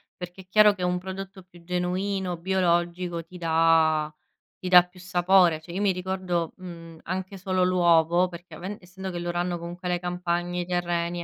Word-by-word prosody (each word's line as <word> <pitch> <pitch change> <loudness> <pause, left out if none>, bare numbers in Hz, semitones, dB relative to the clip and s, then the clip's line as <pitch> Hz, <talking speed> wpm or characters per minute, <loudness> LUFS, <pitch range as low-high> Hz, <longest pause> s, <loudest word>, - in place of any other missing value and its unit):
perché 180 +1 -9
chiaro 210 +2 +6
che 185 -2 -6
un 180 0 +1
prodotto 190 +1 -8
più 175 -1 -18
genuino, 180 +1 -2
biologico 175 -1 0
ti 180 - -12
dà 160 -2 +3 0.5
ti 185 - -5
dà 180 -1 +9
più 180 0 -16
sapore, 180 -2 +3
cioè 165 +2 -11
io 190 - -2
mi 205 -1 +3
ricordo, 180 -2 -2
mhmm, 165 -3 -10
anche 185 +2 -4
solo 185 -1 0
l'uovo 175 -1 +3
perché 175 0 -11
aven 195 +3 -6
essendo 190 +1 -8
che 175 - -5
loro 175 0 -3
hanno 175 0 -1
comunque 175 +2 -6
le 175 0 0
campagne, 175 0 -2
i - - -4
terreni 175 -1 -2
180 Hz, 175 wpm, -26 LUFS, 170-185 Hz, 0.5 s, dà